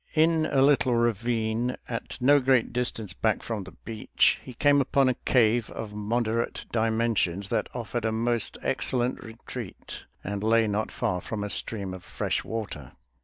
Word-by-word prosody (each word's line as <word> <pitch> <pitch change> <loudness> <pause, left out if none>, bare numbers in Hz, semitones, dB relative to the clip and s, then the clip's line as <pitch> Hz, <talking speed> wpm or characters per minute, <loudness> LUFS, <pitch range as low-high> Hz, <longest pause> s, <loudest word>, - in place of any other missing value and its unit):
In 160 0 +4
a 135 - +3
little 135 -3 +4
ravine 115 +1 0
at 115 +1 -5
no 140 +3 +5
great 130 -3 +2
distance 115 -6 -2
back 110 +5 0
from 110 -4 -4
the 95 - -10
beach, 110 -2 +2
he 130 - -9
came 145 +3 +4
upon 135 0 +3
a - - +2
cave 120 -2 +2
of 110 -2 -6
moderate 115 +2 -1
dimensions 110 -5 +1
that - - 0
offered 115 -1 -3
a 110 - +1
most 115 0 0
excellent 130 -1 -1
retreat 115 -1 -8 0.2
and 100 +1 -3
lay 115 +1 +4
not 105 +1 -1
far 90 -1 -1
from 105 +2 -4
a 105 - -1
stream 100 -4 -1
of 95 - -9
fresh - - -2
water. 100 - -5
115 Hz, 165 wpm, -27 LUFS, 105-125 Hz, 0.2 s, no